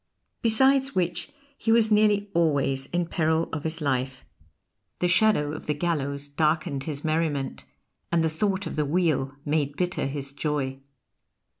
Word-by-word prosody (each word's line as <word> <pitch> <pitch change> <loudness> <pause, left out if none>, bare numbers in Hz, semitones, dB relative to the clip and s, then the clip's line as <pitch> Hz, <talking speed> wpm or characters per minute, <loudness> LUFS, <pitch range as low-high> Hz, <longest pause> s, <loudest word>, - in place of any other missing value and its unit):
Besides 265 +4 +4
which 175 -1 -1 0.3
he 225 - +1
was 225 -1 +4
nearly 210 -1 +3
always 140 -5 +1
in 175 0 -1
peril 160 -1 +1
of 155 -2 -3
his 160 0 -3
life; 130 -2 -2 0.7
the 180 - +1
shadow 175 -5 +3
of 155 - -8
the 150 - 0
gallows 145 -3 -2
darkened 150 -1 0
his 150 -2 -4
merriment, 155 -3 -1 0.5
and 170 -1 +3
the - - +3
thought 190 +4 -1
of - - -5
the 150 - +2
wheel 145 -4 0
made 145 -1 0
bitter 180 -5 -1
his 140 0 -5
joy. 140 -3 -2
160 Hz, 150 wpm, -26 LUFS, 140-180 Hz, 0.7 s, Besides